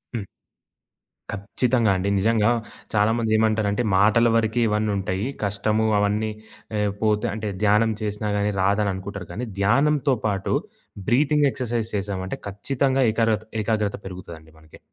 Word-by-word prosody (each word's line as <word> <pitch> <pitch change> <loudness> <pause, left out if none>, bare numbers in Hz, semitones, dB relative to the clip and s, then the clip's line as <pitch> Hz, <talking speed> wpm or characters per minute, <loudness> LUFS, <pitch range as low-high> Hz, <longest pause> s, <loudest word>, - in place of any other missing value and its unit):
హ్మ్. 110 - -2 1.1
ఖచ్చితంగా 115 +3 +1
అండి. 100 +2 -1
నిజంగా, 110 +2 +3 0.4
చాలామందేమంటారంటే 110 0 +2
మాటల 110 +4 +4
వరకే 115 +1 +1
ఇవన్నుంటాయి. 100 -1 -1 0.2
కష్టము 105 +2 0
అవన్నీ 105 +2 0 0.5
ఆహ్, 105 -1 +1
పోతే 110 +1 +1
అంటే 105 -1 -3
ధ్యానం 105 +2 +4
చేసినా 105 0 -2
గాని, 105 +1 +1
రాదననుకుంటారు 100 -1 -1
గాని, 120 +4 -4
ధ్యానంతో 140 +6 +3
పాటు 100 -2 -1 0.6
బ్రీతింగ్ 145 +3 +3
ఎక్సర్సైజ్ 120 -4 -3
చేసామంటే 95 -2 -3
ఖచ్చితంగా 135 +6 0
ఏకారత 110 -1 +1 0.2
ఏకాగ్రత 105 -2 0
పెరుగుతదండి 85 -4 -9
మనకి. 80 0 -17
105 Hz, 115 wpm, -23 LUFS, 100-115 Hz, 1.1 s, మాటల